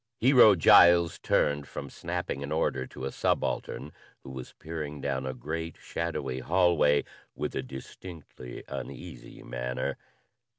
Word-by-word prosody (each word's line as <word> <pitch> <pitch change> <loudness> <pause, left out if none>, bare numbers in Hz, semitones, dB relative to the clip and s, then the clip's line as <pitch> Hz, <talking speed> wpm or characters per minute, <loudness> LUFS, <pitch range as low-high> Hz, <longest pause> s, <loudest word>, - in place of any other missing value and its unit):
Hero 120 -4 +7
Giles 85 0 +6
turned 70 0 +1
from 70 - -7
snapping 70 - -4
an 70 +1 -5
order 65 -4 0
to 65 - -7
a 70 - -3
subaltern 75 - -1 0.3
who 65 - -9
was 65 -2 -8
peering 75 -2 -6
down 65 -1 -2
a 65 - -3
great, 80 +5 -5
shadowy 70 -6 -3
hallway 85 -2 +3 0.3
with - - -3
a - - -1
distinctly 65 0 -10
uneasy 70 - -8
manner. 60 +1 -3
75 Hz, 130 wpm, -28 LUFS, 65-85 Hz, 0.3 s, Hero